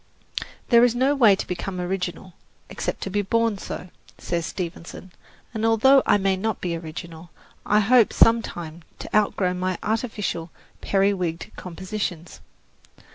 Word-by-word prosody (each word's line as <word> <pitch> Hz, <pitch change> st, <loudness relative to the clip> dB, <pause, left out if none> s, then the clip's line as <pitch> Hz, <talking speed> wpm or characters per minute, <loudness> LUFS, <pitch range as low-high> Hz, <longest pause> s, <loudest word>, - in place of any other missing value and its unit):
"There 235 Hz, -1 st, +7 dB
is 245 Hz, -1 st, +3 dB
no 260 Hz, +3 st, +3 dB
way 230 Hz, -8 st, +6 dB
to -, -, -4 dB
become 180 Hz, +1 st, -4 dB
original, 180 Hz, 0 st, -4 dB, 0.4 s
except -, -, -4 dB
to 195 Hz, -, -4 dB
be 205 Hz, +1 st, +1 dB
born 225 Hz, 0 st, 0 dB
so," 185 Hz, -, -7 dB, 0.3 s
says 170 Hz, -2 st, -3 dB
Stevenson, 180 Hz, +1 st, -7 dB, 0.4 s
and 220 Hz, -1 st, -3 dB
although 225 Hz, +5 st, +5 dB
I -, -, +5 dB
may 195 Hz, -1 st, +1 dB
not 215 Hz, +2 st, -2 dB
be 175 Hz, -2 st, -2 dB
original, 165 Hz, +1 st, -8 dB, 0.4 s
I 210 Hz, +1 st, +4 dB
hope 230 Hz, +2 st, +5 dB
sometime 175 Hz, -8 st, +2 dB, 0.2 s
to -, -, -6 dB
outgrow 200 Hz, -3 st, +2 dB
my 185 Hz, 0 st, -2 dB
artificial, 210 Hz, -6 st, -2 dB, 0.3 s
periwigged 185 Hz, -4 st, 0 dB
compositions. 180 Hz, -2 st, -5 dB
195 Hz, 135 wpm, -24 LUFS, 175-220 Hz, 0.4 s, There